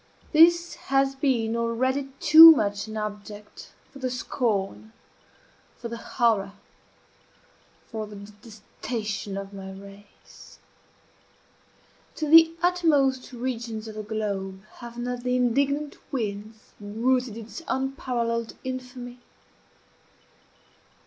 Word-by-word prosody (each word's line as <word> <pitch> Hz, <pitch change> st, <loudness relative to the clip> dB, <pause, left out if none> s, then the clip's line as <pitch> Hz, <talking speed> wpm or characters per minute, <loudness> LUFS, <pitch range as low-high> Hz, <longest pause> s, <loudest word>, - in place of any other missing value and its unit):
This 340 Hz, +2 st, +5 dB, 0.2 s
has 270 Hz, 0 st, +2 dB
been 250 Hz, -5 st, 0 dB
already 260 Hz, +4 st, -1 dB
too 325 Hz, -1 st, +10 dB
much 205 Hz, -6 st, -2 dB
an 220 Hz, 0 st, -6 dB
object 210 Hz, 0 st, -8 dB, 0.2 s
for 275 Hz, -, -13 dB
the 260 Hz, -1 st, -2 dB
scorn 220 Hz, -4 st, -3 dB, 0.8 s
for 235 Hz, -, -7 dB
the 235 Hz, -, -6 dB, 0.2 s
horror 220 Hz, -5 st, +2 dB, 1.3 s
for 220 Hz, -2 st, -6 dB
the 210 Hz, -, -11 dB
detestation 210 Hz, 0 st, -7 dB
of 195 Hz, 0 st, -7 dB
my 190 Hz, -1 st, -8 dB
race. 200 Hz, +1 st, -15 dB, 1.6 s
To 310 Hz, -, -3 dB
the 325 Hz, +1 st, +8 dB
uttermost 290 Hz, -8 st, +2 dB
regions 235 Hz, -3 st, -5 dB
of 220 Hz, -, -8 dB
the 215 Hz, -, -6 dB
globe 200 Hz, -3 st, -4 dB
have 235 Hz, -1 st, -10 dB
not 245 Hz, 0 st, -4 dB
the 250 Hz, 0 st, -1 dB
indignant 280 Hz, +4 st, 0 dB
winds 215 Hz, -3 st, -5 dB
bruited 230 Hz, +3 st, -1 dB
its 230 Hz, +8 st, -9 dB
unparalleled 245 Hz, -4 st, -2 dB
infamy? 250 Hz, -1 st, -7 dB
235 Hz, 105 wpm, -25 LUFS, 210-265 Hz, 1.6 s, too